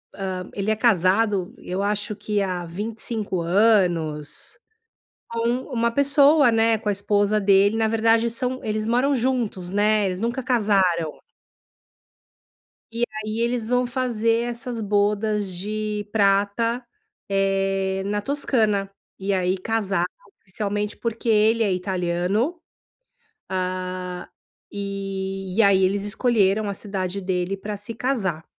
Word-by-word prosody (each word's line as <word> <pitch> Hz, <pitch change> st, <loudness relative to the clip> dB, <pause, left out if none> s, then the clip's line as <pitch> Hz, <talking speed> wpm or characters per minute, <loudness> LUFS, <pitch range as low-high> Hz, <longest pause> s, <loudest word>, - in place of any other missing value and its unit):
hã, 185 Hz, -2 st, -4 dB
ele 200 Hz, +1 st, -2 dB
é -, -, +2 dB
casado, 200 Hz, -2 st, +2 dB
eu 185 Hz, +2 st, -4 dB
acho 205 Hz, +1 st, -1 dB
que 210 Hz, 0 st, -1 dB
há 180 Hz, -2 st, -2 dB
25 210 Hz, +2 st, -4 dB
anos 170 Hz, -, +1 dB, 0.7 s
com 230 Hz, 0 st, -1 dB, 0.3 s
uma 235 Hz, -1 st, +2 dB
pessoa, 280 Hz, +1 st, +5 dB
né, 225 Hz, 0 st, +3 dB
com 215 Hz, 0 st, -3 dB
a -, -, +3 dB
esposa 205 Hz, +1 st, +1 dB
dele 200 Hz, +1 st, +4 dB
na 225 Hz, -1 st, +2 dB
verdade 225 Hz, +1 st, +3 dB
são 250 Hz, +2 st, -3 dB
eles 215 Hz, 0 st, -2 dB
moram 250 Hz, +5 st, +2 dB
juntos, 235 Hz, -8 st, -1 dB
né, 210 Hz, 0 st, +2 dB
eles 185 Hz, 0 st, -3 dB
nunca 235 Hz, +4 st, -2 dB
casaram 195 Hz, -, +1 dB, 1.7 s
e 235 Hz, +1 st, -1 dB, 0.2 s
aí 215 Hz, +1 st, -3 dB
eles 235 Hz, -1 st, -1 dB
vão 250 Hz, 0 st, +2 dB
fazer 235 Hz, -2 st, 0 dB
essas 235 Hz, -1 st, -5 dB
bodas 205 Hz, -1 st, 0 dB
de 210 Hz, +2 st, -3 dB
prata, 210 Hz, +4 st, +1 dB, 0.4 s
eh, 195 Hz, -1 st, 0 dB
na 205 Hz, +1 st, -1 dB
Toscana, 215 Hz, -7 st, +1 dB, 0.3 s
e 195 Hz, +1 st, -1 dB
aí 185 Hz, 0 st, +1 dB
casar 195 Hz, -3 st, -1 dB, 0.4 s
oficialmente, 205 Hz, +2 st, -3 dB
porque 230 Hz, 0 st, -3 dB
ele 220 Hz, +1 st, +4 dB
é 205 Hz, -, +1 dB
italiano, 185 Hz, -, -1 dB, 0.9 s
hã, 185 Hz, -1 st, -3 dB, 0.4 s
e 195 Hz, -1 st, -4 dB
e 225 Hz, -, +5 dB
aí 195 Hz, -2 st, +5 dB
eles 195 Hz, +2 st, +1 dB
escolheram 205 Hz, -1 st, +2 dB
a -, -, -3 dB
cidade 195 Hz, -1 st, -4 dB
dele 185 Hz, 0 st, -1 dB
para 205 Hz, +2 st, -5 dB
se 205 Hz, +3 st, -7 dB
casar. 205 Hz, -, -1 dB
205 Hz, 125 wpm, -23 LUFS, 190-230 Hz, 1.7 s, pessoa